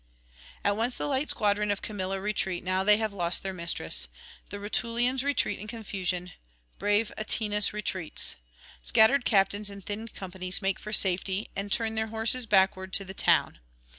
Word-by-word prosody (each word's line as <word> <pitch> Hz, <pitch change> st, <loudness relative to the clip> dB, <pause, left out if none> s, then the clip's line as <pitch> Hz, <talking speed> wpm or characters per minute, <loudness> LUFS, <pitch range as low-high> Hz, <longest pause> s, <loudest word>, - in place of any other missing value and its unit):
[868 205 Hz, -, +2 dB
901]At -, -, -6 dB
once 240 Hz, +2 st, 0 dB
the -, -, -1 dB
light 285 Hz, 0 st, -1 dB
squadron 210 Hz, 0 st, +1 dB
of 205 Hz, -1 st, -1 dB
Camilla 195 Hz, -2 st, -3 dB
retreat 190 Hz, -3 st, -1 dB
now 185 Hz, +1 st, 0 dB
they 210 Hz, +1 st, +6 dB
have 220 Hz, -2 st, -2 dB
lost 175 Hz, -3 st, +1 dB
their 190 Hz, 0 st, -3 dB
mistress; 170 Hz, -, 0 dB, 0.4 s
the 205 Hz, -, -6 dB
Rutulians 240 Hz, +5 st, 0 dB
retreat 280 Hz, -7 st, 0 dB
in 210 Hz, -, -8 dB
confusion, 185 Hz, -5 st, -4 dB, 0.5 s
brave 205 Hz, +1 st, +1 dB
Atinas 210 Hz, -1 st, +2 dB
retreats. 190 Hz, -5 st, -3 dB, 0.5 s
Scattered 230 Hz, -, +4 dB
captains 205 Hz, 0 st, +2 dB
and 200 Hz, -1 st, -11 dB
thinned 215 Hz, +2 st, -6 dB
companies 185 Hz, -1 st, -3 dB
make 195 Hz, -2 st, -1 dB
for 210 Hz, -, -8 dB
safety, 190 Hz, 0 st, +1 dB
and 200 Hz, +1 st, -4 dB
turn 225 Hz, +1 st, +2 dB
their 220 Hz, 0 st, -1 dB
horses 225 Hz, +2 st, +2 dB
backward 190 Hz, -2 st, +2 dB
to 195 Hz, -, +2 dB
the 190 Hz, -, -8 dB
town. -, -, +2 dB
205 Hz, 165 wpm, -28 LUFS, 190-220 Hz, 0.5 s, they